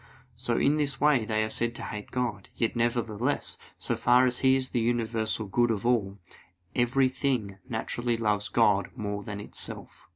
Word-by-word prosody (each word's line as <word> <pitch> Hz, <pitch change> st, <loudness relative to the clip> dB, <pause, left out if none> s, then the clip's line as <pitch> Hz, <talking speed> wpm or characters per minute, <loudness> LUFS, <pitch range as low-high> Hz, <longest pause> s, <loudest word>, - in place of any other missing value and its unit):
So 120 Hz, 0 st, -1 dB
in 145 Hz, +2 st, +3 dB
this 140 Hz, -2 st, -1 dB
way 145 Hz, -6 st, +4 dB
they 110 Hz, 0 st, +1 dB
are 110 Hz, -, -2 dB
said 120 Hz, 0 st, -1 dB
to -, -, -6 dB
hate 105 Hz, -1 st, -6 dB
God; 120 Hz, -6 st, -3 dB
yet 115 Hz, 0 st, 0 dB
nevertheless, 120 Hz, +2 st, -1 dB, 0.2 s
so -, -, -2 dB
far 125 Hz, +1 st, +4 dB
as 125 Hz, -1 st, 0 dB
He 130 Hz, 0 st, +5 dB
is 130 Hz, -1 st, -1 dB
the 120 Hz, -, +1 dB
universal 115 Hz, -2 st, 0 dB
good 120 Hz, +5 st, +2 dB
of 110 Hz, -2 st, -1 dB
all, 105 Hz, -5 st, +1 dB, 0.6 s
every 130 Hz, +2 st, +3 dB
thing 125 Hz, -7 st, -1 dB
naturally 120 Hz, +1 st, -1 dB
loves 105 Hz, -2 st, 0 dB
God 100 Hz, -2 st, +3 dB
more 105 Hz, -3 st, -3 dB
than 105 Hz, 0 st, -6 dB
itself. 105 Hz, -, -4 dB
115 Hz, 175 wpm, -28 LUFS, 105-125 Hz, 0.6 s, He